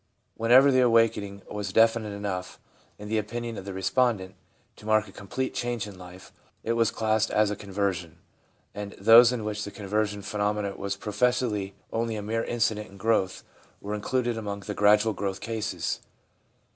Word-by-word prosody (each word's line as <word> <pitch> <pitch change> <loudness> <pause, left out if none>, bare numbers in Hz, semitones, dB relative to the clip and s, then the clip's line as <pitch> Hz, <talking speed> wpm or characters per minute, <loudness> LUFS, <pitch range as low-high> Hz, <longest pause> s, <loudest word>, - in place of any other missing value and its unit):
Whenever 125 +5 +6
the 130 - +4
awakening 115 -5 +2
was 105 -2 -4
definite 115 0 +3
enough, 100 -3 -4 0.4
in 105 - -9
the 110 +1 +1
opinion 115 +2 -4
of 95 - -7
the 100 - -5
respondent, 95 0 0 0.4
to 105 - -13
mark 110 0 +3
a - - -12
complete 130 +7 -4
change 120 -3 -2
in 100 -2 -10
life, 90 0 -12 0.3
it 115 - 0
was 115 -1 +2
classed 110 0 +1
as 105 -1 +2
a - - -2
conversion, 95 -5 -3 0.6
and 105 -1 -6
those 115 +4 +7
in 120 -3 -3
which 105 0 -3
the - - -5
conversion 105 0 -2
phenomenon 105 -1 -1
was 100 0 -2
pro 105 +1 -7
fessedly 105 -4 +1 0.2
only 115 0 -1
a 105 - -4
mere 115 +2 -1
incident 110 -2 -1
in 100 - -14
growth 95 -2 0 0.4
were 105 +1 -5
included 120 +2 -1
among 100 -2 -5
the 105 - -5
gradual 105 +2 +4
growth 100 -1 -3
cases. 110 -1 -3
105 Hz, 170 wpm, -27 LUFS, 100-115 Hz, 0.6 s, those